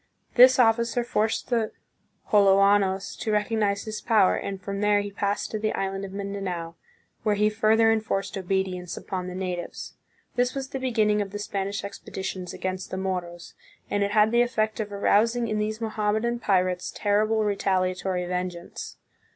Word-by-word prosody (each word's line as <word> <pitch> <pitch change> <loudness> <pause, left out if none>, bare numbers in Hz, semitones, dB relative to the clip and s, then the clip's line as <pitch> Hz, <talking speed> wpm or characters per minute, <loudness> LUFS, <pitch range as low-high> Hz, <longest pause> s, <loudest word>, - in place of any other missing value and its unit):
This 255 +1 +8
officer 235 0 +3
forced 220 +1 -1
the 225 -3 +1 0.6
Joloanos 195 -1 +4
to 220 - -2
recognize 210 -1 +1
his 215 -1 -5
power, 215 -5 +4
and 195 -1 -4
from 200 +1 -5
there 210 0 +4
he 205 0 -6
passed 200 0 -2
to 215 - -2
the 215 0 -1
island 195 0 -2
of 190 - -8
Mindanao, 195 -4 -4 0.5
where 210 -1 +1
he 210 +1 +2
further 220 +1 +4
enforced 215 -3 -1
obedience 185 -2 -2
upon 185 -1 -4
the 180 - -6
natives. 180 -2 -5 0.4
This 245 +1 +1
was 270 -1 -4
the 270 - -4
beginning 215 -5 +2
of 200 - -3
the 205 - -6
Spanish 200 -1 -3
expeditions 190 -2 -6
against 185 0 -4
the 185 - -4
Mo 190 -1 -1
ros, 175 0 -12 0.4
and 205 - +1
it 200 - +1
had 210 +1 +4
the 235 0 +4
effect 220 -3 0
of 210 -1 -3
arousing 230 +4 +2
in 215 -1 -1
these 215 +1 -1
Moham 215 -2 -1
medan 235 +2 -1
pirates 185 -4 +1
terrible 215 +1 +2
retaliatory 185 -2 0
vengeance. 180 -1 -5
205 Hz, 165 wpm, -26 LUFS, 190-220 Hz, 0.6 s, This